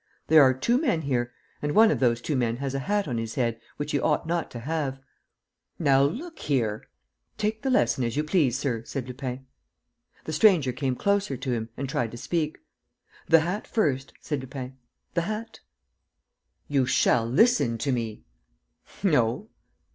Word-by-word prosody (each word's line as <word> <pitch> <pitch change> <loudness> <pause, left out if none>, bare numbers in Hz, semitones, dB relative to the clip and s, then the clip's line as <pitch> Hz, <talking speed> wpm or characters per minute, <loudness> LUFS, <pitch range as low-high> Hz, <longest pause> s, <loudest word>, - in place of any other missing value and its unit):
There 160 -1 +8
are 130 -2 +7
two 235 - +2
men 225 - +1
here; 120 -3 -1 0.3
and 150 0 -2
one 220 0 +7
of - - 0
those 120 -2 +2
two 150 - -2
men 120 -2 0
has 135 0 -3
a 135 - -1
hat 205 +8 0
on 120 -4 -2
his 115 0 -5
head, 115 -3 0 0.2
which 145 +1 -3
he 145 - +1
ought 150 +3 +1
not 170 0 -1
to 120 - -7
have." 140 -1 -2 0.8
"Now 135 -4 +4
look 260 - -2
here.. 115 -7 -1 0.2
." - - -49
"Take 215 +1 -1
the 270 - -1
lesson 250 - +2
as 115 +2 -2
you 150 - +2
please, 150 -6 +2
sir," 120 -5 -2
said 130 +1 -5
Lupin. 130 0 -6 0.8
The 155 - -5
stranger 175 - +4
came 130 0 -2
closer 200 -5 0
to 130 - -3
him 115 -1 -3
and 135 - -3
tried 120 -3 -1
to 120 - -9
speak. 155 +4 -2 0.7
"The 165 -1 +6
hat 180 +6 -3
first," 140 - 0
said 145 -4 -3
Lupin, 130 0 -7 0.4
"the 170 - +1
hat... 215 +5 -5 0.5
." - - -51
"You 130 -2 +3
shall 125 -2 +3
listen 135 - +3
to 135 +4 -1
me!" 115 -4 -3 0.8
"No." 150 - +2
135 Hz, 180 wpm, -26 LUFS, 125-170 Hz, 0.8 s, There